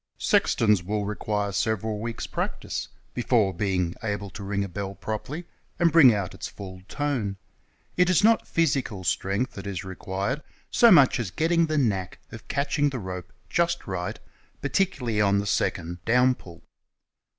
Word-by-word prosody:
Sextons 105 -5 +3
will 105 +3 -2
require 105 0 -2
several 110 +1 -1
weeks' 115 +1 -4
practice - - -3 0.3
before 115 -5 +2
being 90 -2 0
able 100 -3 -3
to 100 - -9
ring 100 0 -1
a - - -3
bell 100 +1 -5
jiropcrly 130 +10 -4 0.3
and 170 -1 +3
bring 150 -6 +8
out 100 -4 -2
its - - -6
full 95 -2 -9
tone. 130 -9 -2 0.6
It 180 0 +4
is 185 +2 +4
not 225 +1 +4
physical 135 - 0
strength 100 +7 0
that 100 0 -7
is 95 -4 -4
required 95 +8 -3 0.3
so 235 -1 +6
much 145 - +6
as 110 -5 -2
getting 165 - +2
"the 155 0 0
knack" 100 -9 0
of 110 - -10
catching 145 +1 +1
the 135 - -4
rope 90 -4 -6 0.2
just 170 - 0
right, 90 -2 -4 0.4
particularly 125 - 0
on 100 -1 +3
the 100 - 0
second 85 -4 -1
"DOWN 125 +2 +4
PULL." 85 -8 -14
105 Hz, 160 wpm, -26 LUFS, 95-135 Hz, 0.6 s, bring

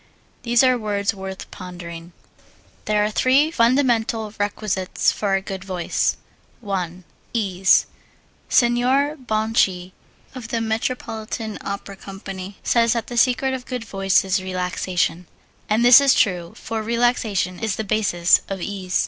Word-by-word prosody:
These 240 +1 +3
are 255 -1 +3
words 205 -2 -1
worth 190 -1 -8
pondering. 175 -2 -9 0.7
There 210 -1 +2
are 210 - -2
three 270 +7 +3
fundamental 230 -5 +1
requisites 205 -2 0
for 200 -2 -1
a 195 - -1
good 190 -1 -6
voice: 185 -3 -1 0.4
1. 185 -4 -4 0.3
Ease 190 -4 +3 0.6
Signor 255 +5 +3
Bonci 215 -6 0 0.4
of 250 -4 -8
the 230 0 -2
Metropolitan 220 -1 -3
Opera 200 0 -5
Company 195 0 -8
says 230 -1 +3
that 230 -2 -2
the 240 - -7
secret 255 +2 +2
of 255 -1 -6
good 250 -3 -4
voice 195 -2 +2
is 190 0 0
relaxation; 180 -2 -2 0.4
and 220 +3 +2
this 245 +3 +9
is 275 -1 +4
true, 175 -4 +1
for 225 -1 -4
relaxation 220 -5 0
is 220 -3 -1
the 220 - -3
basis 200 -5 +3
of 195 -1 -4
ease. 185 -1 -2
210 Hz, 135 wpm, -22 LUFS, 190-235 Hz, 0.7 s, this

